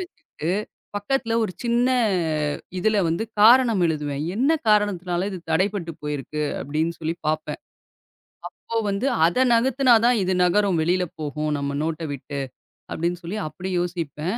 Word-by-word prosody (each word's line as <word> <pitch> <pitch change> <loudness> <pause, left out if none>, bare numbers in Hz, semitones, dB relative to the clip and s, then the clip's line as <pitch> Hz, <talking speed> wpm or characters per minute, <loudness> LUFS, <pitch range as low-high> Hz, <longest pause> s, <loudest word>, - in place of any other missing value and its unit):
வச்சுகிட்டு 335 - -6 0.5
பக்கத்துல 230 +2 -1
ஒரு 185 - -4
சின்ன 240 +1 +2 0.9
இதுல 215 +3 +2
வந்து 170 +7 -1 0.2
காரணம் 230 -2 +6
எழுதுவேன். 145 -2 -2
"என்ன 260 +7 +1 0.2
காரணத்துனால 185 -4 +1
இது 185 - -5
தடைபட்டுப் 170 -1 -1
போயிருக்கு?" 150 +1 -3 0.2
அப்படின்னு 155 +4 -1
சொல்லிப் 165 +1 -4
பாப்பேன். 155 0 -2 1.1
அப்போ 230 - -3
வந்து, 200 +6 -1 0.2
"அத 170 +9 +1
நகர்த்தினா 255 +1 +4
தான், 245 -1 +4
இது 185 0 0
நகரும். 185 0 +2
வெளில 180 +3 +1 0.2
போகும் 150 0 -2
நம்ம 140 0 -3
நோட்ட 165 +1 -2
விட்டு." 140 +1 -6 0.5
அப்படின்னு 170 +2 -2
சொல்லி 190 +6 -4
அப்படி 185 +4 -6
யோசிப்பேன். 175 +2 -3
180 Hz, 135 wpm, -23 LUFS, 155-215 Hz, 1.1 s, காரணம்